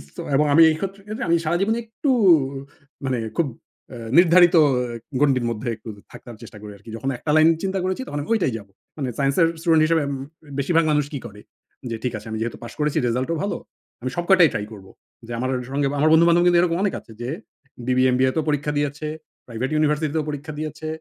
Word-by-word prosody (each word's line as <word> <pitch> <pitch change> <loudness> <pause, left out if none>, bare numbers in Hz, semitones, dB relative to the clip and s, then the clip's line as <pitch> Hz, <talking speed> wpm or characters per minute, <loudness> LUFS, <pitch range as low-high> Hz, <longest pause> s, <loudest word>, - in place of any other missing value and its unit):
So - - -6
এবং 150 +2 +3
আমি 165 +3 +8
এই 155 - +1
ক্ষত্রে 195 +2 -5
ক্ষেত্রে 215 +5 -5
আমি 170 - +5
সারাজীবনে 195 +8 +1
একটু 230 +5 -2 0.9
মানে 130 -2 -1 0.2
খুব 170 - +2 0.4
অ্যা 115 -1 -8
নির্ধারিত 175 0 +6 0.6
এ - - +1
গন্ডির 135 -4 +3
মধ্যে 115 +2 -5
একটু 110 +1 -11 0.2
থাকার 120 - -11
চেষ্টা - - -11
করি 105 - -9
আরকি। 100 +3 -15
যখন 135 +4 -3
একটা 150 - -3
লাইন 155 +1 +6
চিন্তা 190 0 -1
করেছি, 185 +5 -2
তখন 145 - -4
আমি 145 - -9
ঐটাই 180 - +1
যাবো। 100 -2 -13 0.3
মানে 135 -4 -2
সাইন্সের 140 +5 +3
স্টুডেন্ট 160 -2 +3
হিসেবে 165 -1 +2
উম 140 - -3 0.4
বেশিরভাগ 165 +4 +2
মানুষ 150 -1 +2
কি 140 - -3
করে? 105 -2 -10 0.5
যে 115 - -3
ঠিক 125 -2 -2
আছে, 105 - -11
"আমি 110 - -3
যেহেতু 115 0 -3
পাশ 120 - -8
করেছি, 150 -1 0
রেজাল্ট 125 +4 -1
ও - - -1
ভালো। 205 - -2 0.4
আমি 130 - -2
সব 175 - -1
কয়টাই 180 -4 +7
ট্রাই 105 - -2
করবো।" 95 -2 -12 0.4
যে 120 - -8
আমার 130 +1 -1
অ - - 0
সঙ্গে 140 0 0
আমার 155 - +4
বন্ধু-বান্ধব 170 +1 +5
কিন্তু 175 -1 +5
এরকম 170 -1 +1
অনেক 200 - 0
আছে 115 - -18
যে 120 - -4 0.6
বিবিএ, 130 0 +3
এমবিএতেও 130 +4 +1
পরীক্ষা 150 0 0
দিয়েছে। 145 +1 -2 0.4
প্রাইভেট 120 +2 -3
ইউনিভার্সিটিতেও 155 0 +1
পরীক্ষা 145 +1 -6
দিয়েছে। 155 0 -5
150 Hz, 210 wpm, -22 LUFS, 130-170 Hz, 0.9 s, আমি